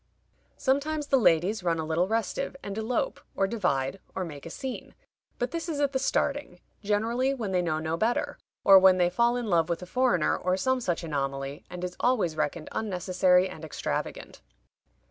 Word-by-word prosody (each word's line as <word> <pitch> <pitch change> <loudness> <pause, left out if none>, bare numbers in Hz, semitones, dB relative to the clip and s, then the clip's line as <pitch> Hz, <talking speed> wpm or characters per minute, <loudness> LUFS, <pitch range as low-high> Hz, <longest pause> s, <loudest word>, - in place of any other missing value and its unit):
Sometimes 295 +3 0
the 275 -2 +3
ladies 190 +1 +3
run 170 -2 0
a 160 - -2
little 165 +3 +1
restive, 225 +5 -2
and 200 - -5
elope, 240 - -1 0.2
or 195 - +2
divide, 180 - -1 0.2
or 185 - -2
make 150 -2 -9
a - - -7
scene, 260 +8 -6 0.4
but 245 - -2
this 335 +1 -4
is 300 -3 -2
at 285 -1 +2
the 265 - 0
starting, 275 -7 -1 0.2
generally 230 +6 0
when 220 -7 -3
they 180 -1 +2
know 160 -3 -1
no 160 +1 -2
better, 245 - 0 0.2
or 195 -1 +9
when 190 -1 +6
they 175 -1 +2
fall 235 +5 +2
in 245 - -3
love 170 -6 +2
with 170 +1 -2
a - - -6
foreigner, 220 -5 +2
or 185 +1 0
some 260 +5 +1
such 175 -5 -1
anomaly, 140 -2 -3
and 180 0 -7
is 180 0 -4
always 215 -11 +1
reckoned 155 +1 -2
unnecessary 185 -2 +2
and 175 -4 -10
extravagant." 160 - -4
190 Hz, 185 wpm, -28 LUFS, 170-245 Hz, 0.4 s, or